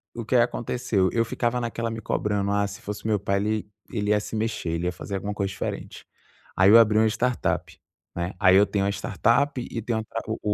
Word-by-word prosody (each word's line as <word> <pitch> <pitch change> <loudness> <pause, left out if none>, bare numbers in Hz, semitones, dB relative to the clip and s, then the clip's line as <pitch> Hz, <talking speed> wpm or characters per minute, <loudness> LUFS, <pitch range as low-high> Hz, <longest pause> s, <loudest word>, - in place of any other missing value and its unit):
o 115 - -4
que 120 - 0
aconteceu, 120 -4 +1
eu 115 0 +1
ficava 120 +1 -1
naquela 115 -1 -3
me 115 - -5
cobrando: 100 -2 -1
“Ah, 100 0 +2
se 100 0 -9
fosse 105 0 -6
o - - -3
meu 105 -2 +2
pai, 100 0 0
ele 105 0 -2 0.2
ele 105 -3 -2
ia 105 0 +4
se 105 - -6
mexer, 110 -5 -2
ele 85 +1 -2
ia 90 - +1
fazer 100 +2 -6
alguma 100 +2 -3
coisa 100 -2 -2
diferente.”. 95 - -6 0.5
Aí 95 +1 +6
eu 115 +3 +9
abri 110 -2 +4
uma 110 - +5
startup, 120 +3 -1 0.4
né? 85 +2 -3
Aí 95 -2 +6
eu 100 +2 +6
tenho 100 -1 -1
uma 100 - +1
startup 125 +7 +1
e 115 - -4
tenho 115 0 -1
o - - -4
tra 115 +1 -5
o 110 - -3
105 Hz, 235 wpm, -25 LUFS, 100-115 Hz, 0.5 s, eu